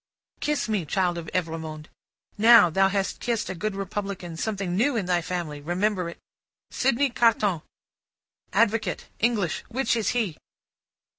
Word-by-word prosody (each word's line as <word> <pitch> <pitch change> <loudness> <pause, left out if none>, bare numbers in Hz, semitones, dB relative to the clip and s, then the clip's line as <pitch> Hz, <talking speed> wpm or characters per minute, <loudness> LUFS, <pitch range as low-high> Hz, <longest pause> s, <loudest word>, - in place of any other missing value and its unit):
"Kiss 300 -4 -1
me, 210 -5 0
child 175 +2 0
of 165 - -7
Evrémonde. 160 -3 -3 0.5
Now, 220 -5 +7
thou 195 +3 +4
hast 195 0 -1
kissed 235 -5 -1
a - - -3
good 200 +3 -3
Republican; 195 -3 -4
something 195 -1 -2
new 245 +7 +2
in 210 -5 0
thy 175 -1 +1
family; 170 -4 -4
remember 180 +3 0
it! 170 - -10 0.5
Sydney 270 +1 +1
Carton. 210 -8 +2 0.9
Advocate. 215 -2 +1
English. 215 -7 0
Which 240 0 0
is 225 -3 0
he?" 215 -10 -1
195 Hz, 140 wpm, -25 LUFS, 175-225 Hz, 0.9 s, Now